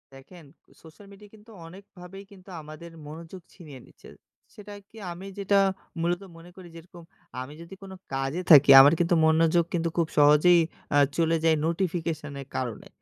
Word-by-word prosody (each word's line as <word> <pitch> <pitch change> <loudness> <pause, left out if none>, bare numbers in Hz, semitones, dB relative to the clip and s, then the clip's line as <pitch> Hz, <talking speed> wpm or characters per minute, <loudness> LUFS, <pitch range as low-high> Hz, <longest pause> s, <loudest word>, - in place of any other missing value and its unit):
দেখেন। 155 +4 -16 0.4
Social 160 +5 -17
media 205 +1 -16
কিন্তু 215 +2 -19 0.2
অনেকভাবেই 190 +1 -14
কিন্তু 195 -1 -17
আমাদের 155 +3 -12 0.2
মনোযোগ 165 +4 -11
ছিনিয়ে 150 -8 -13
নিচ্ছে। - - -19 0.4
সেটায় 205 -2 -12
কি? - - -24 0.2
আমি 180 +3 -10
যেটা 200 0 +1 0.4
মূলত 175 +2 -2 0.2
মনে 165 +1 -15
করি, 185 -2 -13
যেরকম 170 +1 -14 0.4
আমি 130 +3 -10
যদি 170 +3 -12
কোনো 190 -1 -11 0.2
কাজে 135 +6 -3
থাকি, 145 -2 +7
আমার 145 +3 +5
কিন্তু 175 0 +1
মনোযোগ 165 +2 +2
কিন্তু 170 -1 -1
খুব 165 - 0
সহজেই 150 +4 +5 0.3
অ্যা 145 - +3 0.2
চলে 165 0 +1
যায় 165 -1 +3
নোটিফিকেশনের 160 -5 -4
কারণে। 120 -3 -5
170 Hz, 155 wpm, -25 LUFS, 155-185 Hz, 0.4 s, থাকি